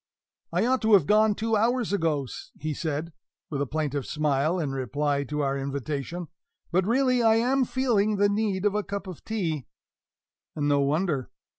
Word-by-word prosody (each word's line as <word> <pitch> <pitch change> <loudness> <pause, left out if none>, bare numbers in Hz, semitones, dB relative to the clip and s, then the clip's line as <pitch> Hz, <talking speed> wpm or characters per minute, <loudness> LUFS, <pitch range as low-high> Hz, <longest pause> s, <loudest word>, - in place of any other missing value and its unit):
"I - - +1
ought 260 +1 +2
to 220 0 +3
have 190 -7 +6
gone 215 +2 +4
two 225 +1 0
hours 235 0 +1
ago," 155 -8 0 0.3
he 155 +1 -2
said, 155 +2 -3 0.4
with 140 -2 -2
a 140 - -1
plaintive 145 -1 -2
smile, 150 +2 +1
in 150 -5 -1
reply 140 +2 -1
to 150 +2 -2
our 135 0 0
invitation; 140 +4 -4 0.4
"but, 185 +2 +2
really, 255 +1 +3
I 225 -1 +5
am 255 +3 +2
feeling 235 -5 +1
the 205 0 +3
need 205 -2 0
of 205 - +3
a 210 - +1
cup 200 0 -5
of 185 -4 -9
tea" 165 - -2 0.9
(and 145 -1 0
no 145 -1 +3
wonder!) 145 -1 0
175 Hz, 175 wpm, -26 LUFS, 145-215 Hz, 0.9 s, have